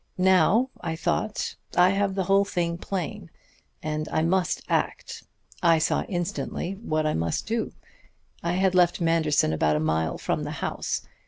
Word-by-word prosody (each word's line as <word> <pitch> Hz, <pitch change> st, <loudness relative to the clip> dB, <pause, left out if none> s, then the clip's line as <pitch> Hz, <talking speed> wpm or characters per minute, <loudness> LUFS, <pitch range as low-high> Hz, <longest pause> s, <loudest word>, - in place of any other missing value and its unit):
"Now, 190 Hz, +7 st, +4 dB
I 160 Hz, -, -3 dB
thought, 175 Hz, +6 st, -1 dB, 0.2 s
I 180 Hz, +1 st, +7 dB
have 195 Hz, -1 st, 0 dB
the 190 Hz, -, 0 dB
whole 195 Hz, +2 st, +4 dB
thing 170 Hz, -3 st, -2 dB
plain, 185 Hz, 0 st, -4 dB, 0.5 s
and 155 Hz, 0 st, -2 dB
I 160 Hz, -, +1 dB
must 180 Hz, +2 st, +1 dB
act. -, -, -2 dB, 0.4 s
I 170 Hz, -2 st, +5 dB
saw 155 Hz, -, +1 dB
instantly 175 Hz, 0 st, -3 dB
what 155 Hz, -8 st, -1 dB
I 155 Hz, -, +1 dB
must 80 Hz, 0 st, -1 dB
do. 230 Hz, 0 st, -2 dB, 0.7 s
I 170 Hz, -, -1 dB
had 190 Hz, 0 st, +2 dB
left 180 Hz, -1 st, +3 dB
Manderson 160 Hz, -, +2 dB
about 75 Hz, -1 st, +2 dB
a -, -, +1 dB
mile 80 Hz, +1 st, 0 dB
from -, -, -1 dB
the -, -, -4 dB
house. -, -, -2 dB
175 Hz, 160 wpm, -26 LUFS, 155-190 Hz, 0.7 s, I